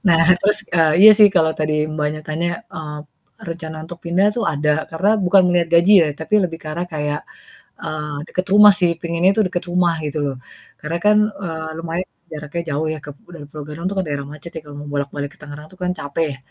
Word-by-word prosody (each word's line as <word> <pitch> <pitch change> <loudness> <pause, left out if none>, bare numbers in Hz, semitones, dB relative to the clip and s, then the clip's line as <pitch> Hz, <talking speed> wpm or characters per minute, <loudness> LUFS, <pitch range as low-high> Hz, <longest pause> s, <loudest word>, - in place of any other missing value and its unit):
Nah 165 -2 +5 0.2
terus, 210 +1 +3 0.2
eee, 160 -2 +4
iya - - +12
sih 210 -1 +8
kalau 160 -4 +2
tadi 150 0 0
Mbaknya 155 0 -3
tanya, 160 +3 -2 0.2
eee, 155 -6 -7 0.4
rencana 165 -5 -7
untuk 175 0 -11
pindah 175 +4 +2
tuh 235 - -2
ada 150 -3 0
karena 195 +7 +2
bukan 190 -2 +4
melihat 175 -1 +1
gaji 185 +5 +4
ya, - - +2
tapi 160 +6 -3
lebih 165 -2 -3
ke 160 - -15
arah 175 - -3
kayak, 150 -2 -2 0.6
eee, 150 -1 -4
deket 185 0 -2
rumah 210 0 +9
sih, 175 -1 +3
penginnya 170 +2 +1
tuh 220 - +2
deket 175 0 -3
rumah 175 -1 +1
gitu 150 +1 -4
loh. 140 -2 -2 0.4
Karena 160 +3 -3
kan, 210 0 +4 0.3
eee, 160 -2 -5
lumayan 170 +2 -4 0.2
jaraknya 150 +2 -5
jauh 150 +3 -1
ya - - -7
kep 145 -1 -10 0.2
dari 150 -3 -10
Pulogadung 150 +2 -8
itu - - -4
kan 190 - 0
daerah 145 -1 -3
macet 155 +3 -10
ya 160 - -5
kalau 145 -1 -12
mau 145 - -8
bolak 140 -1 -2
balik 145 -1 -6
ke - - -26
Tangerang 150 +1 -10
itu 185 - -18
kan 180 - 0
capek 145 +3 -2
ya. 135 - -6
160 Hz, 220 wpm, -19 LUFS, 150-175 Hz, 0.6 s, iya